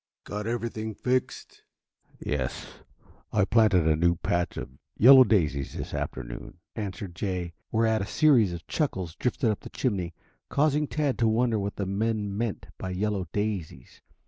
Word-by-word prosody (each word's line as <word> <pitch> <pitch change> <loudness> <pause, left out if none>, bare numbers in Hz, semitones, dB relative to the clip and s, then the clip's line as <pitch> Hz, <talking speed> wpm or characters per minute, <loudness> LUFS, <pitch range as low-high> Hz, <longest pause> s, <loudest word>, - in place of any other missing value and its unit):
"Got 105 +1 -5
everything 110 -2 -3
fixed?" 130 +4 -2 0.6
"Yes. 65 -4 -3 0.7
I 105 -2 +3
planted 105 -7 +4
a 80 - +4
new 85 +2 +3
patch 85 0 -1
of - - -7 0.2
yellow 130 +3 +9
daisies 75 - +1
this - - -5
afternoon," - - -5 0.2
answered 100 -3 -5
Jay, 90 -1 -3 0.2
whereat 110 -1 +2
a 100 - -3
series 120 - +4
of 85 -2 -7
chuckles 95 - -2
drifted 125 -2 0
up 105 - -3
the - - -10
chimney, 95 -9 -2 0.3
causing 150 +1 +2
Tad 145 -3 -1
to 115 - +3
wonder 115 0 +2
what 100 0 -3
the 100 - -2
men 105 +1 -1
meant 115 -1 -2
by 95 - -4
"yellow 95 0 -1
daisies." 100 - -4
105 Hz, 150 wpm, -27 LUFS, 90-115 Hz, 0.7 s, yellow